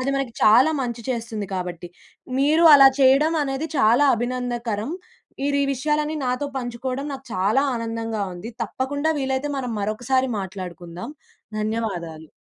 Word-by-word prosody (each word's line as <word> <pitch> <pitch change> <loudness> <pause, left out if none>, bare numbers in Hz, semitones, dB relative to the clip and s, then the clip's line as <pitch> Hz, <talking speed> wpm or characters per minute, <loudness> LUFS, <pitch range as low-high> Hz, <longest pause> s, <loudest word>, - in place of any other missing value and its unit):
అది 265 +2 -1
మనకి 270 -4 -2
చాలా 240 +8 +6
మంచి 235 -1 -4
చేస్తుంది 225 -4 -4
కాబట్టి. 180 -1 -5 0.5
మీరు 305 +5 +3
అలా 275 -1 +9
చెయ్యడం 275 +5 +5
అనేది 275 +3 -3
చాలా 265 +3 +4
అభినందనకరం. 240 0 -3 0.5
మీరు 285 0 +1
ఈ - - +2
విషయాలన్నీ 300 +3 -1
నాతో 250 +3 -1
పంచుకోడం 255 +2 -4
నాకు 270 0 -8
చాలా 205 +9 +2
ఆనందంగా 225 -2 -3
ఉంది. 195 +7 -8
తప్పకుండా 285 +7 -2
వీలైతే 265 +1 -1
మనం 250 -3 -3
మరొకసారి 245 +5 0
మాట్లాడుకుందాం. 180 - -7 0.5
ధన్యవాదాలు. 180 -8 -3
245 Hz, 130 wpm, -23 LUFS, 215-270 Hz, 0.5 s, అలా